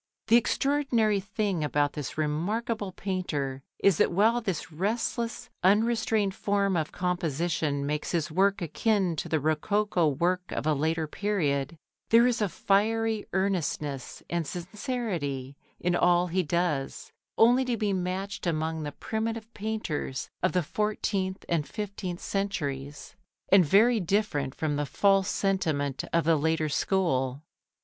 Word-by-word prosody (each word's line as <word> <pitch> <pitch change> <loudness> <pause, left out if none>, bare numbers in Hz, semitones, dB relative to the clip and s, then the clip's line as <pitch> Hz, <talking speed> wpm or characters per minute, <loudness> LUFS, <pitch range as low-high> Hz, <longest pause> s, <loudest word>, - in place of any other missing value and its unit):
The 230 - +7
extraordinary 240 -4 +2
thing 200 -4 -2
about 145 -1 +1
this 145 -1 -5
remarkable 200 +8 -1
painter 155 -9 -3 0.2
is 195 -5 +3
that - - +3
while 220 +7 +3
this 185 -7 -3
restless, 230 +6 -2
unrestrained 215 0 +2
form 200 -1 0
of 160 -2 -1
composition 165 -4 -1
makes 150 +1 -2
his 170 -2 -1
work 195 +3 +2
akin 190 +1 +1
to - - -3
the 160 - +1
rococo 170 +4 +1
work 180 +5 0
of - - -3
a 155 - +3
later 160 +2 0
period, 155 -5 -1 0.3
there 230 +1 +6
is 245 -2 +1
a 205 - +1
fiery 220 +3 +1
earnestness 165 -8 -2
and 170 -3 -2
sincerity 175 - -4 0.2
in 175 0 +1
all 175 0 +4
he 180 +1 0
does, 165 -4 -2 0.3
only 245 +3 +5
to 245 -2 -1
be 205 -2 0
matched 185 +1 -3
among 160 -1 -1
the 145 -1 -5
primitive 225 +3 -4
painters 200 -11 -3
of 185 - +1
the 180 -1 +2
fourteenth 200 0 -2
and 160 -4 0
fifteenth 200 -4 -5
centuries, 145 -8 -3 0.3
and 195 -1 +7
very 220 +9 +4
different 175 -8 0
from 150 -2 -1
the 145 - 0
false 195 +5 +3
sentiment 155 -9 0
of 170 0 +2
the 165 0 +3
later 160 +1 +1
school. 140 -6 0
180 Hz, 140 wpm, -28 LUFS, 155-210 Hz, 0.3 s, The